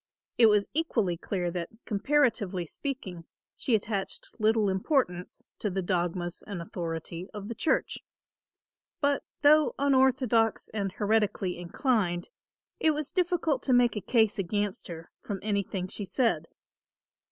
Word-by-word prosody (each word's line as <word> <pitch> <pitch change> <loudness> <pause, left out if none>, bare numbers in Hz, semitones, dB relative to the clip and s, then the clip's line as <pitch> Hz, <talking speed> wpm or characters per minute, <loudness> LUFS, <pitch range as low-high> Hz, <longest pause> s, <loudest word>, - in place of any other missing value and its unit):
It 230 - +8
was 210 -1 +3
equally 230 - 0
clear 175 0 -2
that, 170 -1 -4 0.2
comparatively 215 -6 +1
speaking, 190 - -6 0.3
she 240 - +1
attached 205 -2 -2
little 215 -1 +3
importance 190 - -1
to 210 - -1
the 190 0 -2
dogmas 175 -1 -1
and 200 -4 -5
authority 170 +1 -5
of 205 -1 -6
the - - -2
church. 315 - 0 1.0
But 285 -1 +2 0.2
though 300 0 +5
unorthodox 260 -5 +3
and 200 -3 -2
heretically 205 -3 +1
inclined, 175 -1 0 0.5
it 315 -1 +3
was 300 -2 -3
difficult 345 -7 +1
to 260 - +1
make 245 -1 +4
a 210 - -2
case 220 +1 +2
against 205 +1 -2
her 165 -1 -9
from 200 -2 -4
anything 200 -3 -1
she 200 +2 -3
said. 235 +4 +1
210 Hz, 130 wpm, -29 LUFS, 180-255 Hz, 1.0 s, It